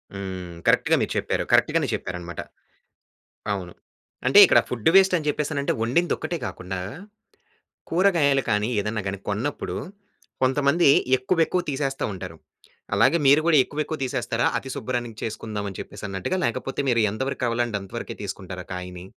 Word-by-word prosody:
హ్మ్. 95 -3 -6
కరెక్ట్‌గా - - +4
మీరు - - -1
చెప్పారు. - - -1
కరెక్ట్‌గానే - - +3
చెప్పారన్నమాట. 90 -1 -6 1.1
అవును. 90 -3 -4 0.5
అంటే - - +6
ఇక్కడ - - +6
ఫుడ్ 120 +2 0
వేస్ట్ 190 -1 +6
అని 155 -2 -4
చెప్పేసానంటే 145 -1 -1
వండిందొక్కటే 170 +7 0
గాకుండా. 95 0 -5 1.1
కూరగాయలు 165 -7 +3
కానీ 105 +2 +1
ఏదన్నా 105 0 -2
గాని 100 0 -4
కొన్నప్పుడు 110 +8 -2 0.7
కొంతమంది 140 +4 +3 0.3
ఎక్కువెక్కువ 165 +7 +1
తీసేస్తా 135 -1 -2
ఉంటారు. 95 - -7 0.6
అలాగే 165 +6 +4
మీరు 145 +3 +7
కూడా 165 -3 +5
ఎక్కువెక్కువ 155 +2 -4
తీసేస్తారా? 130 - -1
అతి 135 - -8
శుబ్రాన్నికి 120 -3 -4
చేసుకుందాం 110 -2 -4
అని 95 - -10
చెప్పేసన్నట్టుగా? 95 - -4
లేకపోతే 130 +4 -2
మీరు 120 -2 +3
ఎంత 110 +4 -4
వరకు 140 - -5
కావాలంటే 120 -2 0
అంత 95 - -11
వరకే - - -6
తీసుకుంటారా 95 -2 -6
కాయని? 90 0 -7
120 Hz, 135 wpm, -24 LUFS, 100-145 Hz, 1.1 s, మీరు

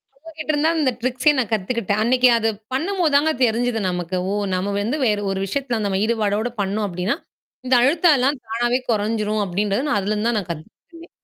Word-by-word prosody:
அவுங்க 325 +4 -14
கிட்ட 310 - -1
இருந்துதான், 320 +3 +1
இந்த 265 -3 +2
ட்ரிக்ஸயே 255 +4 +2
நான் 235 -5 -1
கத்துக்கிட்டேன். 210 0 -1
அன்னைக்கு 250 +2 +4
அது 225 0 +1 0.2
பண்ணும்போது 335 +2 0
தாங்க 300 +3 +4
தெரிஞ்சுது 235 0 0
நமக்கு. 180 0 -3 0.2
ஓ! - - -1 0.2
நம்ம 190 +2 -1
வந்து 235 +9 -1
வேற 210 -3 +2
ஒரு 190 - -2
விஷயத்தல 245 +1 -2
நம்ம 195 -1 0
ஈடுபாடோட 220 0 0
பண்ணோம் 205 +2 -1
அப்டின்னா. 180 - -2 0.5
இந்த 255 0 +3
அழுத்த 320 +7 +3
எல்லாம் 265 +2 +1
தானாவே 240 +3 0
கொறைஞ்சிரும் 215 -1 0
அப்டின்றது, 200 +7 -1
நான் 290 - +1
அதுலருந்து 210 +3 -1
தான் 235 - 0
நான் 180 - -8
கத்துகிட்டேனே! 330 - -12
230 Hz, 180 wpm, -21 LUFS, 205-270 Hz, 0.5 s, அன்னைக்கு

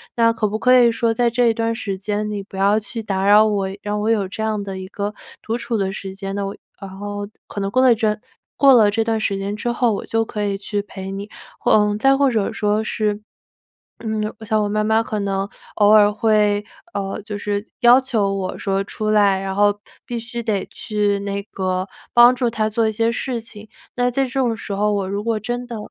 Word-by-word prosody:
那 230 -1 +4
可 215 - 0
不 210 +1 -2
可 250 +3 +4
以 240 -1 +5
说 230 0 0
在 240 +1 +2
这 240 +1 +1
一 230 - +4
段 230 0 -1
时 200 -4 -4
间， 210 +1 -2
你 205 - -3
不 195 0 -11
要 200 +2 +3
去 220 +2 -6
打 195 -2 -2
扰 210 +2 +6
我， 200 -3 0 0.2
让 210 0 -2
我 220 - 0
有 205 -4 +1
这 205 - -7
样 215 -2 -1
的 195 -1 -6
一 185 - -7
个 205 +2 -4 0.3
独 225 +1 -2
处 230 - -2
的 195 -1 -1
时 195 0 -7
间。 195 0 -5
那 200 - -2
我 195 - -6 0.2
然 195 -2 -8
后 205 0 -5 0.2
可 205 - -7
能 195 - -1
过 255 +5 +2
了 255 - +6
一 - - -2
阵 215 -1 0 0.4
过 275 -1 +7
了 215 -3 +5
这 225 +2 +1
段 225 0 0
时 200 -2 -1
间 200 +1 -3
之 240 +2 -2
后， 240 -1 +1
我 - - -4
就 225 0 0
可 210 -1 -4
以 200 -1 0
去 205 +1 -3
陪 190 -2 -8
你， 200 +1 -5 0.3
或 - - +1
呃， 210 -1 +4
再 270 +5 +4
或 280 0 +3
者 220 -5 0
说 210 +1 0
是， 210 -1 -1 0.8
嗯， 215 -1 -3
我 - - -8
想 215 0 +1
我 210 - 0
妈 215 +1 0
妈 220 +1 +2
可 215 -2 -3
能 195 0 -1 0.3
偶 205 -1 +5
尔 210 -1 +7
会， 210 -1 +2 0.3
呃， 195 +1 -3
就 210 -1 -6
是 205 +1 -3
要 245 +1 +7
求 215 -7 0
我 185 -1 -4
说 195 0 0
出 215 +2 -3
来， 205 -2 +4
然 195 0 -3
后 205 +1 +3 0.3
必 240 -1 -4
须 235 +1 -5
得 210 -4 -1
去 205 -2 -1
那 200 0 -3
个 185 0 -1 0.3
帮 240 +1 +7
助 245 -2 0
她 220 -1 0
做 220 +1 +1
一 220 - -1
些 230 +2 +1
事 245 -1 -3
情。 215 -1 -12 0.3
那 245 0 +1
在 270 +2 +1
这 250 - -6
种 255 -4 0
时 205 - -7
候 210 +1 +1
我 195 -2 -1
如 200 +1 -3
果 225 0 0
真 240 +3 -4
的 235 - -5
210 Hz, 255 characters per minute, -20 LUFS, 200-230 Hz, 0.8 s, 过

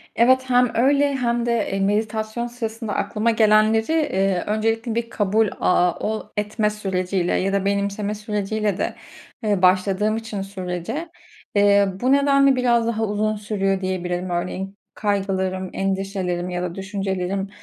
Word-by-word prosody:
Evet 260 +3 +4
hem 245 -1 +4
öyle 280 +3 +3
hem 240 -2 0
de, 235 - +1 0.2
eee, 195 - -1
meditasyon 215 +3 -1
sırasında 225 -2 -5
aklıma 230 +1 0
gelenleri, 220 +3 +3
eee, 195 - +1
öncelikle 225 +2 0
bir 230 0 -2
kabul, 210 +1 +1
aaa, 180 -1 +3
ooo, 215 0 -3
etme 210 +1 0
süreci 190 -2 -2
ile 180 0 +1
ya 195 +1 0
da 195 -1 0
benimseme 200 +1 -1
süreci 210 0 -3
ile 210 -3 0
de, - - -2 0.5
eee, 205 -3 +1
başladığım 190 +4 +3
için 220 -3 -5
sürece, 195 - -5 0.5
eee, 200 0 +5
bu 255 - +2
nedenle 275 -1 +4
biraz 240 -2 +2
daha 225 -1 -1
uzun 215 +1 0
sürüyor 195 -2 -1
diyebilirim. 180 -1 -2
Örneğin 185 +3 -3 0.2
kaygılarım, 190 -2 -1
endişelerim 190 -2 -2
ya 180 0 -3
da 175 -1 -4
düşüncelerim, 195 -1 -3
210 Hz, 145 wpm, -22 LUFS, 195-225 Hz, 0.5 s, eee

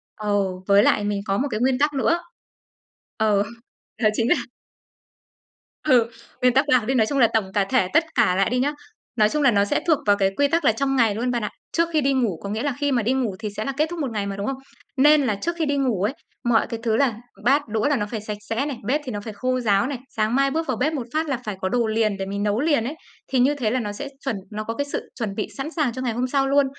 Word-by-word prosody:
Ừ, 200 -3 -1
với 200 +1 +6
lại 205 - +3
mình 205 -1 -1
có 195 0 0
một 280 - 0
cái 215 - -1
nguyên 255 +1 +2
tắc 295 0 +2
nữa. 335 +6 +2 1.0
Ờ, 210 -2 +3 0.6
đó 215 - +6
chính 230 +2 +1
là - - +5 1.5
Ừ, 245 -6 +4 0.3
nguyên 250 -1 +4
tắc 270 +2 +4
bạc 250 -6 +3
đi, 265 - +1
nói 220 -4 +3
chung 280 - -1
là 230 - +7
tổng 200 -4 0
cả 200 -2 +3
thể 255 -8 +3
tất 325 +1 +5
cả 180 - +3
lại 195 +2 +2
đi 250 +1 0
nhá. 285 +3 +1 0.4
Nói 215 -2 +4
chung 300 +3 -1
là 265 - +6
nó 200 -1 +3
sẽ - - +1
thuộc 315 -3 +5
vào 205 -1 +4
cái 195 -1 +2
quy 285 0 +4
tắc 330 0 0
là - - +6
trong 270 +4 -1
ngày 225 -5 +3
luôn 245 +3 -1
bạn 240 -2 -1
ạ. 210 - -1 0.2
Trước 335 0 +1
khi 305 - +3
đi 275 0 +2
ngủ, 230 -10 0
có 200 - -4
nghĩa 220 +4 -2
là 285 -3 0
khi 285 -1 +1
mà 240 -3 +2
đi 250 +4 +1
ngủ 240 -8 -1
thì 215 -2 -3
sẽ 215 - -2
là 275 - -1
kết 305 +2 +2
thúc 345 -1 -5
một 270 -5 -2
ngày 205 -2 -2
mà, 195 - -4
đúng 200 +1 -4
không? 270 -1 -2 0.4
Nên 295 +2 +6
là 220 -6 0
trước 340 +12 -3
khi 320 - +2
đi 285 -1 0
ngủ 240 -9 0
ấy, 225 +6 +1 0.3
mọi 235 -2 +2
cái 230 - -5
thứ 220 -2 +1
là 250 -4 +2 0.3
bát, 280 +1 +3
đũa 220 +4 0
là 290 - +2
nó 210 -4 -1
phải 215 0 -5
sạch 210 -1 -5
sẽ 235 +5 0
này, 280 -5 -4
bếp 285 +8 0
thì 255 - -5
nó 205 - -3
phải 220 0 -7
khô 255 +4 -1
ráo 215 +1 +2
này, 275 -3 -3
sáng 220 +2 0
mai 275 0 +3
bước 320 +1 -1
vào 255 -4 -1
bếp 300 +6 0
một 250 -5 -4
phát 315 0 0
là 265 - 0
phải 210 -2 -3
có 190 - 0
đồ 235 0 +1
liền 215 -2 +1
để 195 - -3
mình 200 +1 -3
nấu 210 +2 +1
liền 290 -5 +2
ấy. 280 +6 -4 0.3
Thì 260 - 0
như 280 +4 +4
thế 230 -6 -1
là 255 - +1
nó 210 -3 -3
sẽ 280 +7 -6 0.2
chuẩn 250 -6 0 0.2
nó 215 +1 -4
có 225 - -4
cái 285 - -1
sự 285 - -5
chuẩn 210 -4 -3
bị 215 - -2
sẵn 290 +4 -4
sàng 290 -8 +1
cho 255 - -5
ngày 240 -3 -1
hôm 250 +2 -1
sau 270 +1 +1
luôn. 280 0 +4
245 Hz, 290 wpm, -23 LUFS, 210-275 Hz, 1.5 s, là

